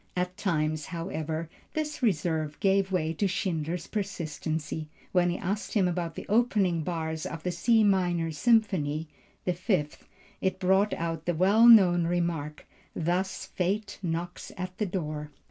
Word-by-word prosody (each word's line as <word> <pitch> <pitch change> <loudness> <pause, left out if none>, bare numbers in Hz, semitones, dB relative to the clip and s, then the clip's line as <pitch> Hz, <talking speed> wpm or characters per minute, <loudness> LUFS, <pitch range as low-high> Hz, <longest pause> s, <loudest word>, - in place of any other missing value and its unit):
At 180 0 -1
times, 155 -5 -1
however, 165 -2 -4 0.3
this 305 -1 -2
reserve 160 - 0
gave 195 0 +2
way 165 -3 0
to 200 +5 0
Schindler's 175 -3 -2
persistency. 160 -6 -3 0.2
When 175 -1 +3
he 175 - -1
asked 200 +5 -3
him 195 -4 +4
about 170 -2 -2
the - - -6
opening 205 -6 +2
bars 160 -1 -3
of 165 -1 -7
the 180 - -1
C 220 +6 +3
minor 175 -5 +2
Symphony 165 -7 +2 0.4
(the 180 - +1
Fifth) 175 -5 -2 0.3
it 190 -1 0
brought 190 +3 +3
out 165 -1 -3
the 175 - +1
well 200 +7 +5
known 180 -7 +7
remark, 170 -4 -2 0.3
"thus 180 +3 -1
fate 200 +3 -2
knocks 175 0 -4
at 185 0 -5
the 210 - +1
door." 155 -5 -4
175 Hz, 145 wpm, -28 LUFS, 160-195 Hz, 0.4 s, known